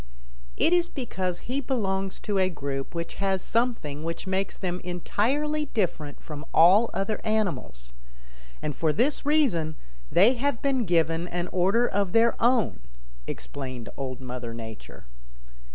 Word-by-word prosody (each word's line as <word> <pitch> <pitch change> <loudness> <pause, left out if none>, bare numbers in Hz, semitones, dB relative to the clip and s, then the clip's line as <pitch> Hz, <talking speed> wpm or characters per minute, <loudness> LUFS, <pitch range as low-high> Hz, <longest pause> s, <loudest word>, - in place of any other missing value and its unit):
"It 340 - +3
is 350 0 +3
because 190 - -3
he 265 +3 -2
belongs 195 -7 -1
to 205 -2 0
a 185 0 +3
group 140 -2 -4
which 170 0 -4
has 195 -1 +2
something 225 - -1
which 165 +3 -4
makes 190 0 -1
them 180 -1 -2
entirely 280 - 0
different 160 - -2
from 150 -2 -8
all 195 +8 +7
other 195 +2 -2
animals, 135 - -2 0.7
and 150 - -2
for 160 -2 +2
this 270 - +1
reason 200 - +2 0.4
they 205 +8 +6
have 265 -1 0
been 265 -4 +1
given 165 -1 +2
an 175 0 -3
order 195 +7 +3
of 200 -3 0
their 230 +1 +5
own," 240 -2 +3 0.5
explained 130 -4 -6
Old 130 -2 -4
Mother 125 -2 -5
Nature. 110 -2 -9
190 Hz, 140 wpm, -27 LUFS, 155-235 Hz, 0.7 s, all